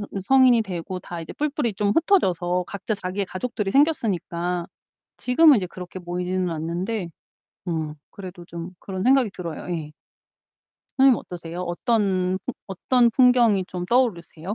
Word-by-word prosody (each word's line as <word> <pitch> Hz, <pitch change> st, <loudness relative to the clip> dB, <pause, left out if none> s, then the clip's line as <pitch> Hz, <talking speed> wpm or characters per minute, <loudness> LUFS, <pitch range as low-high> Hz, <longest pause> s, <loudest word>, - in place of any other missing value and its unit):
어 200 Hz, -1 st, -5 dB
성인이 255 Hz, +1 st, +5 dB
되고 185 Hz, -2 st, -5 dB
다 175 Hz, -1 st, -7 dB
이제 160 Hz, -, -8 dB
뿔뿔이 290 Hz, -7 st, -1 dB
좀 205 Hz, +1 st, 0 dB
흩어져서 180 Hz, -, +2 dB
각자 200 Hz, +2 st, -3 dB
자기의 195 Hz, 0 st, -3 dB
가족들이 205 Hz, 0 st, -3 dB
생겼으니까 180 Hz, -, 0 dB, 0.5 s
지금은 280 Hz, +2 st, +5 dB
이제 185 Hz, -, -3 dB
그렇게 180 Hz, +1 st, -9 dB
모이지는 180 Hz, +1 st, -2 dB
않는데 170 Hz, +4 st, -3 dB, 0.6 s
음 160 Hz, -3 st, -2 dB, 0.2 s
그래도 180 Hz, -3 st, -10 dB
좀 170 Hz, +1 st, -7 dB
그런 190 Hz, -1 st, -5 dB
생각이 260 Hz, -1 st, +4 dB
들어요. 170 Hz, -4 st, -7 dB
예. 155 Hz, -3 st, -4 dB, 1.1 s
선생님 265 Hz, -3 st, +6 dB
어떠세요? 175 Hz, 0 st, -7 dB
어떤 185 Hz, 0 st, 0 dB
풍 255 Hz, -, -3 dB
어떤 235 Hz, +5 st, +2 dB
풍경이 240 Hz, -6 st, +4 dB
좀 180 Hz, -1 st, -5 dB
떠오르세요? 195 Hz, -7 st, 0 dB
190 Hz, 335 characters per minute, -23 LUFS, 175-235 Hz, 1.1 s, 선생님